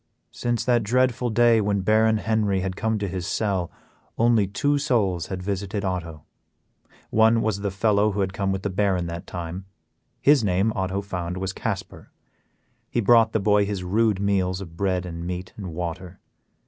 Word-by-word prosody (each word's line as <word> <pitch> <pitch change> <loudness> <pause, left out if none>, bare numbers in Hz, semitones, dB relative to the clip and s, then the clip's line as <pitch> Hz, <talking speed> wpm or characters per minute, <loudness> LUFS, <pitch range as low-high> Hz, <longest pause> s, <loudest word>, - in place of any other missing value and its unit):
Since 120 -1 -2
that 120 -2 +3
dreadful 125 +2 +1
day 115 0 +4
when 100 -1 0
Baron 110 +2 +3
Henry 105 -3 0
had 95 0 -3
come 110 +1 -1
to 100 -1 -2
his 90 -2 -4
cell, 95 -5 -1 0.5
only 115 -3 +3
two 145 +9 0
souls 100 - 0
had 95 -1 -5
visited 100 +1 -3
Otto. 85 -4 -4 0.9
One 110 +1 +4
was 110 -2 0
the 100 0 -2
fellow 105 +1 +2
who 100 0 -2
had 95 -1 -1
come 100 -1 -1
with 95 -1 -3
the 100 - -2
Baron 95 -2 +1
that 85 0 -6
time; 90 +2 -6 0.5
his 145 -3 +4
name, 100 +3 +1
Otto 95 0 -1
found, 90 -3 -4
was 95 0 -3
Casper. - - -5 0.8
He - - -1
brought 115 0 +5
the 110 - +1
boy 105 0 +3
his 100 -2 -3
rude 105 +2 +1
meals 95 -2 0
of 85 -4 -9
bread 95 -1 -1
and 85 -1 -6
meat 90 +1 -5
and 95 -5 -7
water. 90 +2 -6
100 Hz, 175 wpm, -24 LUFS, 90-110 Hz, 0.9 s, brought